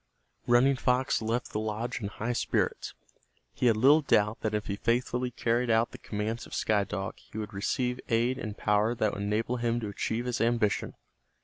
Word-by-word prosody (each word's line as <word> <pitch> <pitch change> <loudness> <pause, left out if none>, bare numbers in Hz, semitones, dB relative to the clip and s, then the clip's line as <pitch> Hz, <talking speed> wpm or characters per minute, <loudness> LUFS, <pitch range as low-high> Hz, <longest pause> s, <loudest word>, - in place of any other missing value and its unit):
Running 130 +3 +4
Fox 125 0 +1
left 115 +2 -2
the 105 - -2
lodge 110 +3 -3
in 100 - -2
high 115 +4 -3
spirits. - - -1 0.6
He 125 - +1
had 115 -2 +4
little 140 +7 +6
doubt 105 -6 +2
that 110 -1 -1
if 105 - -2
he 100 - -2
faithfully 125 +3 0
carried 120 0 0
out 115 +1 +3
the - - -10
commands 110 +2 -4
of - - -7
Sky 105 -2 +2
Dog 95 +1 -5
he - - -12
would 105 -1 -5
receive 125 +5 -1
aid 120 +3 +1
and 105 -2 -5
power 105 +3 +2
that 110 -2 0
would 100 - -4
enable 110 +4 -1
him 120 0 0
to 105 - -3
achieve 110 +4 -2
his 125 -1 -2
ambition. 115 -2 +1
115 Hz, 195 wpm, -29 LUFS, 105-120 Hz, 0.6 s, little